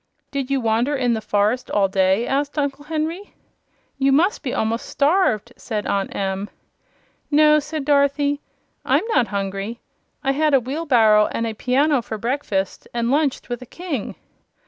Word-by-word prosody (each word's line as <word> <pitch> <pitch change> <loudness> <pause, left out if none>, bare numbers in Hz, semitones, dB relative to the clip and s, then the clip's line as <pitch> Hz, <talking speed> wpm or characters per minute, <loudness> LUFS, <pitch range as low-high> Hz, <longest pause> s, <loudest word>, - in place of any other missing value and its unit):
"Did 275 -2 -3
you 275 -1 +1
wander 230 +5 +1
in 250 -3 +1
the 220 - -2
forest 210 +4 0
all 200 -1 +2
day?" 190 +3 +2
asked 285 +2 -1
Uncle 285 0 -2
Henry. 325 +5 -4 0.6
"You 275 0 +3
must 350 - +2
be 260 - -3
a'most 225 +1 -1
starved!" 280 - +1
said 215 -3 -4
Aunt 200 -1 -1
Em. 195 +1 -2 0.8
"No," 300 +1 +5
said 300 -1 -5
Dorothy, 285 0 +2 0.4
"I'm - - +2
not 240 - +3
hungry. 200 +3 -4 0.4
I 270 - +2
had 300 +1 +2
a - - +5
wheelbarrow 245 -6 +3
and 230 - -2
a 225 - -3
piano 265 +5 +2
for 220 -1 -6
breakfast, 215 -5 -2
and 235 0 0
lunched 285 -1 0
with 245 -1 -4
a 250 - -10
King." 325 - -5
255 Hz, 160 wpm, -21 LUFS, 220-290 Hz, 0.8 s, No